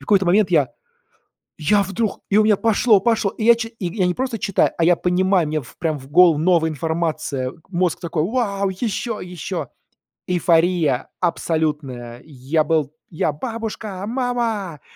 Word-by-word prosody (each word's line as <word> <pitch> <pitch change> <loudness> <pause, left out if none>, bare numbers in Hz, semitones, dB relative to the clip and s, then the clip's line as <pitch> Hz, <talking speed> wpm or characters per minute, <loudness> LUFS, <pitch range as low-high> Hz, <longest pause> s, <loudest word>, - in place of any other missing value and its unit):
какой-то 195 -3 +2
момент 195 +2 +3
я 150 -7 +3 0.9
я 200 +7 +2
вдруг 195 +2 -3
и 205 - +3
у 215 - +6
меня 215 - +5
пошло, 220 -2 +3
пошло, 220 -3 +1
и 215 - -6
я 235 +1 +7
чи 230 -1 -4
и 200 -7 -6
я 185 - +1
не 180 - +1
просто 255 +1 -3
читаю, 200 - +1
а 170 - +1
я 175 0 +5
понимаю, 180 0 +2
мне 155 0 -1
в 125 - -16
прям 160 -3 -1
в 135 - -13
голову 170 -1 +6
новая 165 -1 +3
информация, 155 -4 -2 0.2
мозг 180 -2 0
такой: 165 -3 -2
"Вау, 200 -2 -1
еще, 215 +3 -3
еще!" 180 -4 -5 0.6
Эйфория 170 -5 +2
абсолютная. 150 -8 -2
Я 150 +2 -1
был 155 -3 0 0.2
я: 155 -2 -1
"Бабушка! 215 - -5
Мама! 230 - -2
180 Hz, 160 wpm, -21 LUFS, 155-210 Hz, 0.9 s, я